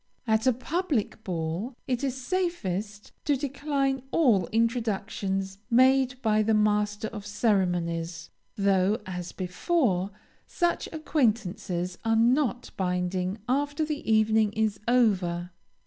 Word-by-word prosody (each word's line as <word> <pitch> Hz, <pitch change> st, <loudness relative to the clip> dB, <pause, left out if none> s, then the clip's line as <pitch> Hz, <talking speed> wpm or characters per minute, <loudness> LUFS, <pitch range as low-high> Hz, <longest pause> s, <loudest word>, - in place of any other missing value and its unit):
At 220 Hz, +1 st, +2 dB
a 255 Hz, -, +5 dB
public 255 Hz, -, -2 dB
ball, 175 Hz, +7 st, -3 dB
it 250 Hz, 0 st, -1 dB
is 265 Hz, -1 st, -1 dB
safest 220 Hz, -, -2 dB
to 290 Hz, -, +3 dB
decline 275 Hz, -1 st, -1 dB
all 230 Hz, -, +3 dB
introductions 200 Hz, -4 st, -1 dB
made 255 Hz, +1 st, +4 dB
by 215 Hz, -1 st, +3 dB
the 220 Hz, +1 st, +2 dB
master 210 Hz, 0 st, +1 dB
of 210 Hz, -3 st, -7 dB
ceremonies, 175 Hz, -6 st, -1 dB, 0.2 s
though, 200 Hz, +1 st, +2 dB
as 180 Hz, -2 st, -5 dB
before, 190 Hz, -, 0 dB, 0.4 s
such 345 Hz, -1 st, 0 dB
acquaintances 210 Hz, -, -1 dB
are 225 Hz, 0 st, +2 dB
not 245 Hz, +2 st, +2 dB
binding 180 Hz, +1 st, -1 dB
after 290 Hz, +4 st, 0 dB
the 295 Hz, -6 st, -3 dB
evening 220 Hz, -1 st, +3 dB
is 215 Hz, -1 st, 0 dB
over. 185 Hz, -8 st, +2 dB
220 Hz, 115 wpm, -27 LUFS, 190-255 Hz, 0.4 s, a